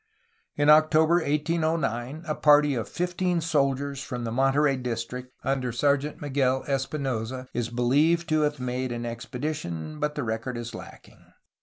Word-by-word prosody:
In 145 0 +1
October 155 +2 +6
1809 155 -3 -1
a 155 - -1
party 150 -1 +5
of 115 -4 -3
fifteen 180 0 -1
soldiers 140 -3 0
from 125 -3 -5
the 115 - -3
Monterey 135 +3 +3
district 125 0 -5
under 130 -2 -1
Sergeant 145 +4 0
Miguel 135 -2 0
Espinosa 130 -3 -2
is 120 -1 -2
be 120 +1 -2
lieved 155 +7 +3
to 155 0 +3
have 150 -1 0
made 125 0 -2
an 120 0 -4
expedition, 120 - -5
but 150 0 -1
the 145 - -2
record 115 +2 -3
is 120 0 -6
lacking. - - -12
135 Hz, 150 wpm, -26 LUFS, 125-150 Hz, -, October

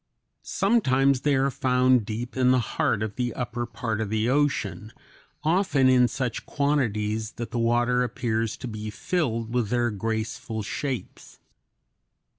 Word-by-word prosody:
Sometimes 140 - +2
they 145 -2 +2
are 135 +1 +2
found 125 -3 +2
deep 120 +3 -5
in 130 -1 +3
the 130 - +5 0.2
heart 105 0 +1
of 110 -2 -5
the 125 -1 -1
upper 120 -1 -3
part 110 -2 -3
of 110 - -2
the 110 +2 0
ocean, 135 -6 0 0.5
often 155 -5 +3
in 125 -1 +5
such 120 0 -3
quantities 110 -7 0
that 120 -1 -6
the 120 - -2
water 120 +2 +2
appears 115 -2 -1
to - - -6
be 110 -1 -5
filled 115 -5 -2
with 120 -4 0
their 120 -1 +1
graceful 110 +1 -3
shapes. 130 +4 -5
120 Hz, 145 wpm, -26 LUFS, 110-130 Hz, 0.5 s, the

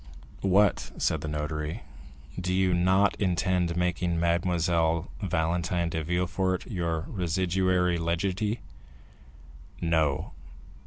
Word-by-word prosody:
"What," 100 +1 +2
said 80 - 0
the 80 - -4
notary, 75 +5 -3 0.6
"do 90 0 -2
you 95 -1 +2
not 95 +3 +3
intend 90 -1 +1
making 90 -1 0
Mademoiselle 85 -1 +1
Valentine 85 -1 0
de 80 -1 -2
Villefort 90 +2 0
your 85 -7 -2
residuary 90 0 +1
legatee?" 95 +6 -1 1.2
"No." 80 -5 +1
90 Hz, 95 wpm, -28 LUFS, 85-95 Hz, 1.2 s, not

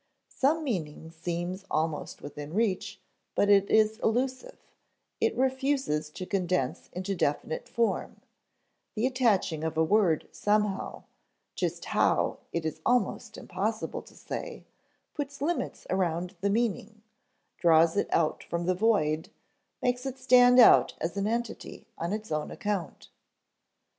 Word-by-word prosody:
Some 310 +4 +2
meaning 160 - -4
seems 175 +3 -4
almost 155 -1 -2
within 145 +2 -7
reach, 205 -2 0 0.4
but 205 - +3
is 215 +2 +4
elusive; 260 - -1 0.6
it - - +1
refuses 265 - 0
to 185 +4 -7
condense 180 -8 -1
into 185 +2 -3
definite 160 -2 -2
form; 235 -1 -1 0.8
the 220 +2 0
attaching 220 - +1
of 160 -1 -2
a 160 - +4
word 180 -3 +2
somehow 210 -1 -1 0.5
(just - - -3
how, - - +1
it 170 -1 -2
is 160 - -4
almost 245 -5 0
impossible 215 +5 -3
to - - -18
say) - - -6 0.5
puts 280 -2 -5
limits 330 +4 -2
around 180 0 -1
the 200 - +1
meaning, 215 0 -1 0.6
draws 165 0 +5
it 205 - +1
out 160 -2 +1
from 170 0 -3
the 185 - +2
void, 175 -7 +1 0.5
makes 250 +1 0
it 265 0 -5
stand 250 -1 +6
out 240 - +7
as 165 +1 -3
an 200 0 0
entity 230 -1 -4
on 170 +2 -2
its 215 -2 -4
own 155 0 -1
account. 205 -6 -4
200 Hz, 130 wpm, -28 LUFS, 170-235 Hz, 0.8 s, out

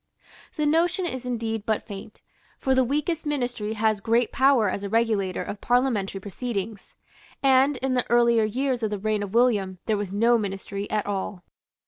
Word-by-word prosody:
The 300 - 0
notion 340 +4 +2
is 260 -6 -4
indeed 225 -2 -2
but 220 0 -1
faint; 205 0 -10 0.3
for 265 - +1
the 260 0 +4
weakest 300 +6 -1
Ministry 245 -8 -2
has 215 -1 +1
great 230 +2 +2
power 265 -5 +4
as 195 +2 -2
a 200 - -3
regulator 215 -4 +1
of 200 - -7
parliamentary 240 -6 +1
proceedings; 205 0 -5 0.5
and 270 +1 +4
in 265 -1 +1
the 250 -1 0
earlier 235 -1 +4
years 250 +3 -1
of 220 - 0
the 210 - -2
reign 215 +1 -1
of 205 +1 -5
William 210 -6 +2
there 215 -2 +1
was 200 -2 -4
no 230 +4 +3
Ministry 200 0 -4
at 215 -1 -1
all. 195 -2 -4
225 Hz, 175 wpm, -25 LUFS, 205-255 Hz, 0.5 s, the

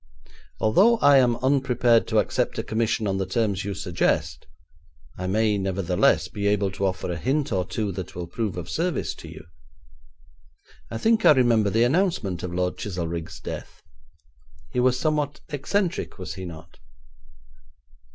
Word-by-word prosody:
'Although 195 - +4
I 145 -7 +6
am 120 -2 +3
unprepared 125 -4 +3
to - - 0
accept - - 0
a - - -1
commission 110 0 -1
on 95 -1 0
the 95 - 0
terms 100 -2 0
you 100 0 -4
suggest, 85 -7 -1 0.7
I 90 - -4
may, 105 +1 +1
nevertheless, 95 +5 +1
be 100 -3 -3
able 100 -1 +1
to 95 +1 -1
offer 95 -1 -3
a 85 - -3
hint 135 - 0
or 95 -3 0
two 105 0 -3
that 95 -1 -7
will 90 0 -4
prove 100 +1 -3
of 90 - -5
service 175 +1 -1
to - - -11
you. - - -10 1.5
I 115 - -4
think 225 - +2
I - - +8
remember 120 -6 +3
the 115 +4 +2
announcement 125 - 0
of 90 - -4
Lord 90 +1 -1
Chizelrigg's 85 -4 -4
death. - - -8 0.9
He 125 - -1
was 125 0 +3
somewhat 150 -1 -1
eccentric, 170 - -2
was 90 - -6
he 95 - -7
not?' 80 -5 -11
105 Hz, 160 wpm, -24 LUFS, 95-130 Hz, 1.5 s, I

